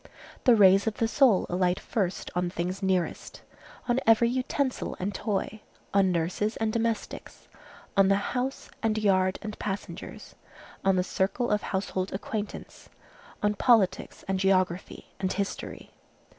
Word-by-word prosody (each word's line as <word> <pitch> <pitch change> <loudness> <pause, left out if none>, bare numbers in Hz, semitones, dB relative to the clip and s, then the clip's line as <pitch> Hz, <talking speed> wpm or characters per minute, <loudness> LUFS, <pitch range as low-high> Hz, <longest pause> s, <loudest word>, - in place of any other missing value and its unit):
The 245 -3 +7
rays 195 0 +6
of 220 - 0
the 225 - +1
soul 230 -5 +4
alight 180 0 +1
first 195 -5 -2
on 180 0 0
things 180 +2 -3
nearest, 190 -3 -2 0.4
on 245 +1 +2
every 225 +1 +5
utensil 260 +1 -2
and 200 +3 -2
toy, 210 +1 -3 0.3
on 195 -2 +4
nurses 180 +6 -1
and 220 -1 -1
domestics, 230 -1 -3 0.5
on 195 -1 +5
the 195 - +4 0.2
house 255 +2 -3
and 220 -1 +1
yard 190 -3 +2
and 215 0 -6
passengers, 200 -1 -6 0.5
on 195 -1 +3
the 180 - +2
circle 195 +6 -1
of 210 0 +2
household 190 -1 -3
acquaintance, 210 +2 -6 0.5
on 210 0 +3
politics 205 -3 +2
and 190 -1 0
geography 185 -2 0
and 190 -1 -1
history. 200 0 -5
195 Hz, 140 wpm, -27 LUFS, 185-225 Hz, 0.5 s, The